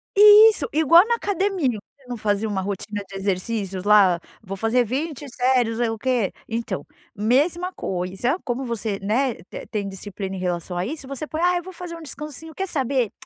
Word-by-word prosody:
Isso! 420 Hz, +2 st, +8 dB
Igual 325 Hz, +4 st, +6 dB
na 470 Hz, -, +2 dB
academia, 390 Hz, -, 0 dB, 0.3 s
você 275 Hz, -2 st, -25 dB
não 245 Hz, -1 st, -5 dB
fazia 210 Hz, 0 st, 0 dB
uma 195 Hz, -2 st, -1 dB
rotina 205 Hz, +1 st, -4 dB
de 195 Hz, -, -11 dB
exercícios, 195 Hz, 0 st, -2 dB
lá? 200 Hz, -4 st, +5 dB, 0.2 s
"Vou 195 Hz, -1 st, -6 dB
fazer 225 Hz, +4 st, +2 dB
20 290 Hz, +5 st, -3 dB
séries, 245 Hz, -2 st, +1 dB
eh, 235 Hz, -2 st, +1 dB
o 225 Hz, -, -4 dB
quê?". 240 Hz, -4 st, 0 dB
Então, 230 Hz, +1 st, -3 dB, 0.3 s
mesma 295 Hz, -, +1 dB
coisa 190 Hz, -, -2 dB
como 255 Hz, -1 st, -2 dB
você, 220 Hz, -4 st, -3 dB
né, 235 Hz, +5 st, +1 dB
te -, -, -8 dB
tem 210 Hz, -3 st, -2 dB
disciplina 195 Hz, 0 st, -6 dB
em -, -, -5 dB
relação 180 Hz, 0 st, -3 dB
a 175 Hz, -, -1 dB
isso, 280 Hz, +3 st, -6 dB
você 275 Hz, +2 st, -5 dB
põe: 315 Hz, +2 st, -4 dB
"Ah, 355 Hz, 0 st, +3 dB
eu 350 Hz, -, -4 dB
vou 375 Hz, +2 st, -10 dB
fazer 340 Hz, -2 st, -8 dB
descansinho 305 Hz, +1 st, -8 dB
quer 385 Hz, -, -2 dB
saber? 265 Hz, -, 0 dB
240 Hz, 185 wpm, -23 LUFS, 200-315 Hz, 0.3 s, Isso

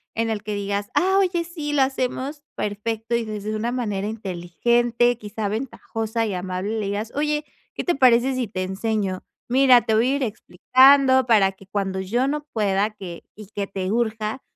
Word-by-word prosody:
En 225 Hz, 0 st, 0 dB
el 210 Hz, -, -2 dB
que 210 Hz, 0 st, -4 dB
digas: 200 Hz, 0 st, -3 dB
"Ah, 380 Hz, +1 st, +3 dB
oye, 355 Hz, -3 st, +1 dB
sí, 320 Hz, -4 st, -5 dB
lo 280 Hz, -2 st, +4 dB
hacemos 265 Hz, +2 st, -2 dB
perfecto", 220 Hz, +2 st, -3 dB
y 235 Hz, -1 st, -1 dB
desde 215 Hz, 0 st, -4 dB
una 230 Hz, +3 st, -2 dB
manera 210 Hz, -5 st, -2 dB
inteligente, 230 Hz, +5 st, 0 dB
quizá, 210 Hz, 0 st, -4 dB
ventajosa 225 Hz, -1 st, -3 dB
y 210 Hz, -, -2 dB
amable, 185 Hz, +4 st, -3 dB
le 205 Hz, -, -2 dB
digas: 210 Hz, +3 st, -3 dB
"Oye, 300 Hz, +1 st, -1 dB, 0.3 s
¿qué -, -, -3 dB
te 350 Hz, -, +1 dB
parece 255 Hz, -1 st, +4 dB
si 255 Hz, -3 st, -2 dB
te 185 Hz, -2 st, -3 dB
enseño? 190 Hz, 0 st, -2 dB, 0.2 s
Mira, 255 Hz, -1 st, +6 dB
te 220 Hz, -, 0 dB
voy 240 Hz, +5 st, +3 dB
a -, -, +1 dB
ir 280 Hz, -, -1 dB
explicando, 260 Hz, +5 st, +4 dB
para 205 Hz, -5 st, +4 dB
que 190 Hz, 0 st, -18 dB
cuando 195 Hz, -1 st, -2 dB
yo 240 Hz, +8 st, 0 dB
no 295 Hz, +1 st, -2 dB
pueda, 205 Hz, -1 st, +1 dB
que 190 Hz, -5 st, -9 dB
y 215 Hz, -1 st, -10 dB
que 200 Hz, -2 st, -3 dB
te 190 Hz, -1 st, -3 dB
urja, 220 Hz, +1 st, -1 dB
220 Hz, 185 wpm, -23 LUFS, 200-255 Hz, 0.3 s, Mira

